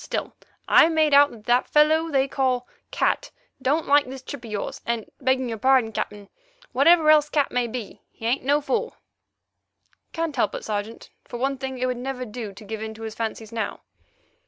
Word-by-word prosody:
Still, - - -4 0.3
I 325 - +6
made 315 -2 +2
out 285 +1 +7
that 240 +3 +2
the - - -29
fellow 315 +2 +4
they 270 -2 +2
call 255 -2 0 0.2
Cat - - 0 0.3
don't 295 +5 +1
like 285 -1 +4
this 265 0 -8
trip 270 -1 -8
of 230 - -9
yours, 210 -2 -4
and, 235 -2 -2 0.2
begging 260 -1 +1
your 225 -2 -5
pardon, 260 -3 +3
Captain, 205 -1 -5 0.4
whatever 310 +4 +5
else 300 -1 +4
Cat 290 -2 +1
may 245 -1 0
be, 235 -2 -7
he 225 - -11
ain't 245 +4 0
no 285 +3 +2
fool." 465 +10 -2 1.2
"Can't 330 -2 -3
help - - 0
it, - - -6
Sergeant. 210 +1 -5
For 240 - -7
one 270 +2 -1
thing, 265 -1 -4
it 255 - -1
would 250 -1 -1
never 255 0 -4
do 220 -2 -6
to 200 +2 -13
give 220 +1 -6
in 220 0 -5
to 225 - -10
his 220 -1 -5
fancies 220 -1 -5
now." 230 -1 -4
255 Hz, 200 wpm, -24 LUFS, 225-285 Hz, 1.2 s, out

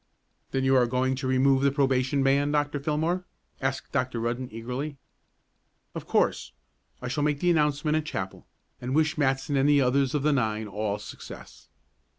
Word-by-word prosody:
"Then 135 - -1
you're 130 -2 +4
going 130 +2 +1
to 130 - -3
remove 130 +1 +3
the 140 - +4
probation 135 -1 +1
ban, 140 +2 +2
Dr. 145 -1 0
Fillmore?" 160 +5 -1 0.4
asked 135 0 -2
Dr. 130 -3 -1
Rudden 120 +2 -2
eagerly. 125 +6 -5 1.0
"Of - - -7
course. - - +1 0.5
I - - -3
shall 140 +4 -2
make 150 -1 +1
the 175 +2 +3
announcement 150 -1 +1
at 155 - -1
chapel, 95 -11 -5 0.3
and 125 +2 -2
wish 155 +1 +2
Matson 140 -1 0
and 135 +1 +3
the 145 -1 +5
others 135 +1 +2
of 145 - 0
the 150 0 +3
nine 110 -4 0
all 105 0 -2
success." - - -11
135 Hz, 165 wpm, -27 LUFS, 125-145 Hz, 1.0 s, the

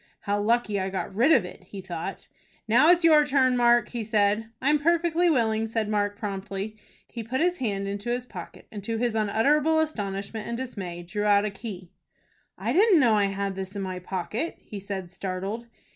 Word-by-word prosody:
"How 205 0 -1
lucky 215 -1 +1
I 190 0 -2
got 190 0 -4
rid 240 +10 +3
of 190 - +5
it!" 180 - -10
he 195 +1 -9
thought. 175 -3 -6 0.4
"Now 245 +9 +5
it's 350 0 +5
your 310 -2 +7
turn, 265 -3 +2
Mark," 240 -2 +4
he 235 -2 -4
said. 210 0 +1
"I'm 295 +3 +2
perfectly 340 +2 +2
willing," 225 -6 +1
said 225 -1 -1
Mark, 205 -1 0
promptly. 200 0 -5 0.3
He 235 - -7
put 250 +4 -2
his 355 +2 +2
hand 200 -5 -2
into 200 +3 -4
his 245 +1 -1
pocket, 180 -8 -10
and, 205 -2 -7
to 225 +2 -2
his 240 0 0
unutterable 280 +9 +2
astonishment 210 -7 -3
and 235 - -3
dismay, 190 -9 -6
drew 205 +5 -3
out 205 0 +4
a 210 - -2
key. 195 -4 -8 0.7
"I - - -2
didn't 395 -2 +5
know 240 -5 +4
I 205 -1 +3
had 195 0 -2
this 190 +1 -6
in 200 - -3
my 185 -1 -4
pocket," 190 - -4
he 205 - -9
said, 190 -3 -6
startled. 195 +5 -4
215 Hz, 195 wpm, -26 LUFS, 195-250 Hz, 0.7 s, your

